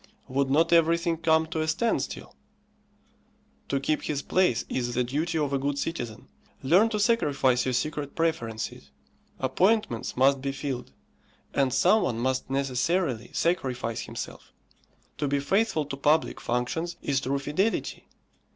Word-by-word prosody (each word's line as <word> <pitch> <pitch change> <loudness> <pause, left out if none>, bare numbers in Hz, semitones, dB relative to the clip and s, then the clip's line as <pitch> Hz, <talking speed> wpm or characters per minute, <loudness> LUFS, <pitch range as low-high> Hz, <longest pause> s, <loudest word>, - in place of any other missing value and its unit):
Would 135 +1 0
not 165 +5 +3
everything 170 +1 +3
come 160 0 +3
to 160 0 -3
a 155 - -1
standstill? 180 +9 -1 1.3
To 140 - +1
keep 150 +3 0
his 145 -2 -3
place 180 -11 +2
is 120 -1 -2
the 125 - +2
duty 155 +7 -1
of 145 -3 0
a 135 - +1
good 140 +1 -1
citizen. 120 -8 -4 0.4
Learn 180 +11 +5
to 215 -2 -2
sacrifice 145 - +2
your 130 - 0
secret 150 +1 -2
preferences. 115 - -2 0.5
Appointments 155 - +1
must 135 +1 +4
be 135 0 -2
filled, 135 -3 -4 0.6
and 135 -2 +2
some 185 - +4
one 120 - -1
must 130 +3 -1
necessarily 135 0 0
sacrifice 125 -9 -1
himself. - - -7 0.7
To 145 - 0
be 140 +1 +1
faithful 190 +1 +1
to 140 -1 -6
public 150 +3 +2
functions 145 +8 -2
is 140 -2 0
true 135 +1 -1
fidelity. 150 +11 -1
140 Hz, 140 wpm, -27 LUFS, 130-165 Hz, 1.3 s, Learn